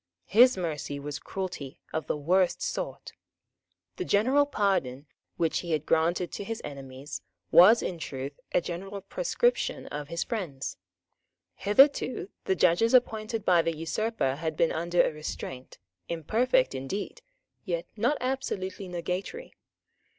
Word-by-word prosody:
His 245 +3 +6
mercy 150 -5 -3
was 145 0 -5
cruelty 180 -8 -6
of 160 - -2
the - - 0
worst 180 +5 +2
sort. - - -4 0.8
The 370 - -2
general 265 - +3
pardon 185 - 0 0.3
which 165 -2 +1
he 170 -2 -3
had 155 -1 0
granted 170 +2 +1
to - - -5
his 225 +2 -4
enemies 135 -3 -7 0.3
was 210 +7 +8
in 175 -2 -3
truth 140 -1 -6
a - - +3
general 195 +4 -5
proscription 485 - 0
of 145 -1 -5
his 170 +2 -2
friends. 170 - -4 0.8
Hitherto 250 -2 +3
the 190 - +2
judges 185 +9 +4
appointed 220 -3 +1
by 175 -2 +5
the 165 -1 -2
usurper 165 - -1
had 160 0 -3
been 165 - +3
under 170 +2 +2
a - - +1
restraint, 135 -4 -7 0.3
imperfect 235 - +2
indeed, 135 +10 -4 0.4
yet 170 -4 -2
not 240 +7 +1
absolutely 205 -7 -3
nugatory. 180 - -4
180 Hz, 135 wpm, -28 LUFS, 155-220 Hz, 0.8 s, was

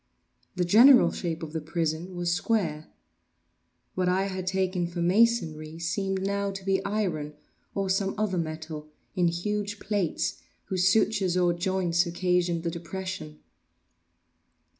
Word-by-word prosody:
The 180 -1 +1
general 245 +9 +7
shape 165 -2 -4
of 155 -1 -7
the 160 - -2
prison 165 +3 -2
was 175 -1 0
square. 170 -6 -1 1.1
What 185 -1 0
I 185 +1 +2
had 190 -2 -4
taken 185 -2 0
for 170 0 -6
masonry 170 -5 +2
seemed 190 +3 -2
now 200 0 -1
to 195 -1 -7
be 195 -1 +1
iron, 175 -8 -2 0.4
or 195 -1 0
some 195 +1 0
other 200 -4 0
metal, 155 -1 -5 0.3
in 180 -2 +3
huge 205 +4 -2
plates, 195 -2 -1 0.2
whose 185 -1 +1
sutures 195 -3 +2
or 175 -1 +3
joints 175 0 +1
occasioned 175 -1 0
the 170 - -1
depression. 170 -2 -6
180 Hz, 135 wpm, -27 LUFS, 170-195 Hz, 1.1 s, general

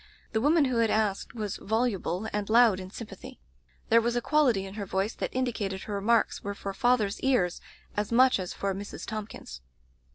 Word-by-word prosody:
The 220 - 0
woman 300 +3 +4
who 255 -3 0
had 230 -1 +3
asked 210 0 0
was 210 -4 -3
voluble 220 -3 -1
and 210 0 -2
loud 225 -4 +5
in 185 0 -7
sympathy. 215 - -10 0.5
There 230 +1 +6
was 235 +1 0
a - - +3
quality 245 -8 +2
in 190 - -8
her 205 -1 -5
voice 195 +4 -1
that - - -3
indicated 220 -7 -2
her 210 - -6
remarks 215 +3 +1
were 200 0 -4
for 200 -1 -5
father's 220 -2 +1
ears 245 -10 +1 0.3
as 210 +1 -2
much 255 -1 +5
as 185 -1 -4
for 195 -1 -2
Mrs. 200 +2 -7
Thomp 215 -1 -5
kins's. 65 - -10
215 Hz, 195 wpm, -28 LUFS, 195-240 Hz, 0.5 s, There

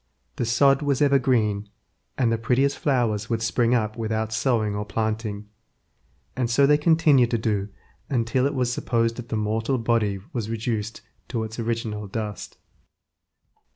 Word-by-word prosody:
The 120 - -1
sod 135 +4 +4
was 140 -3 0
ever 140 -2 +4
green, 105 -5 0 0.5
and 120 -3 +2
the 115 - +1
prettiest 130 +5 +1
flowers 115 -7 0
would 115 -1 -1
spring 120 +1 +2
up 110 -2 -1
without 110 -1 -2
sowing 110 -3 +1
or 105 - -2
planting, 110 -1 -3 0.9
and 125 -2 -1
so 140 +4 +4
they 145 +1 +4
continued 150 -6 +4
to 120 - +1
do 105 -3 -1 0.4
until 125 +1 +1
it 145 - -4
was 125 -2 0
supposed 115 -2 0
the 120 -2 -4
mortal 110 +4 0
body 115 -4 0
was 110 -3 -3
reduced 110 -1 -3 0.3
to 115 -3 -2
its 110 +2 -7
original 110 -2 -3
dust. 105 +1 -5
115 Hz, 155 wpm, -24 LUFS, 110-125 Hz, 0.9 s, sod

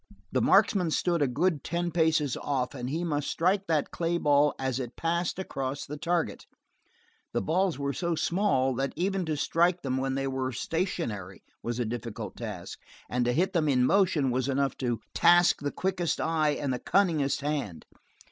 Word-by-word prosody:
The - - +1
marksman 180 -5 +4
stood 170 +1 +1
a 145 - +3
good 150 +3 0
ten 175 +1 -2
paces 160 -4 +2
off, 135 -3 -2
and 125 -2 -5
he 160 +5 -2
must 150 -4 -1
strike 190 +4 +1
that 155 -3 0
clay 170 0 -1
ball 145 -2 +3
as 130 -1 -2
it 125 -2 -5
passed 170 +1 -1
across 135 -7 -4
the 150 - -6
target. 170 +2 -2 0.9
The - - +1
balls 180 +2 +1
were 140 0 -2
so 170 +1 -1
small 165 -8 +1
that 135 0 -1
even 190 0 -1
to 155 -1 -1
strike 175 +4 +1
them 130 -1 -1
when 135 0 -1
they 135 0 -1
were 130 -1 -2
stationary 115 - -3 0.2
was 120 0 -3
a 120 - 0
difficult 115 -3 -5
task, 105 -7 -7 0.3
and 125 0 +1
to 120 - +2
hit 175 +9 +1
them 160 -4 +2
in 125 -2 +3
motion 170 -7 +3
was 130 +2 0
enough 140 0 0
to 120 -3 -2
task 175 +1 +5
the 145 0 -2
quickest 180 -3 -1
eye 155 -2 +1
and 140 -3 -1
the 125 - -3
cunningest 160 -8 +1
hand. 140 - -3
145 Hz, 185 wpm, -28 LUFS, 130-170 Hz, 0.9 s, task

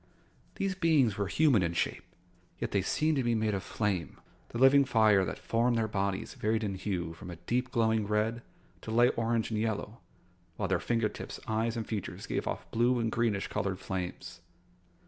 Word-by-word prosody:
These 195 -1 -1
beings 160 - +3
were 100 -1 -1
human 140 -4 +4
in 85 -1 0
shape, - - -1 0.5
yet - - -3
they 100 - +2
seemed 155 - +1
to 135 - +1
be 120 -1 +1
made 110 -1 +1
of 95 - -1
flame. 95 -9 -2 0.3
The - - -5
living 135 +3 +6
fire 110 -6 +4
that 75 - -4
formed 120 +1 +1
their 110 -1 +1
bodies 100 -2 -2
varied 110 +1 0
in 100 -2 -1
hue 95 -3 -3
from 90 +2 -10
a 85 - -6
deep, 120 +10 -2
glowing 110 -3 +1
red 110 +2 0 0.4
to - - -8
light 120 +2 +4
orange 115 0 0
and 110 - 0
yellow, 110 +1 -2 0.6
while 105 - -1
their 95 - +2
finger 115 -2 +1
tips, - - -8
eyes, 115 +2 -1
and 115 - -2
features 105 -4 -4
gave - - -2
off - - -3
blue 120 +2 +3
and 115 -2 0
greenish 110 -4 0
colored 95 -2 -2
flames. 90 -2 -5
110 Hz, 190 wpm, -30 LUFS, 100-120 Hz, 0.6 s, living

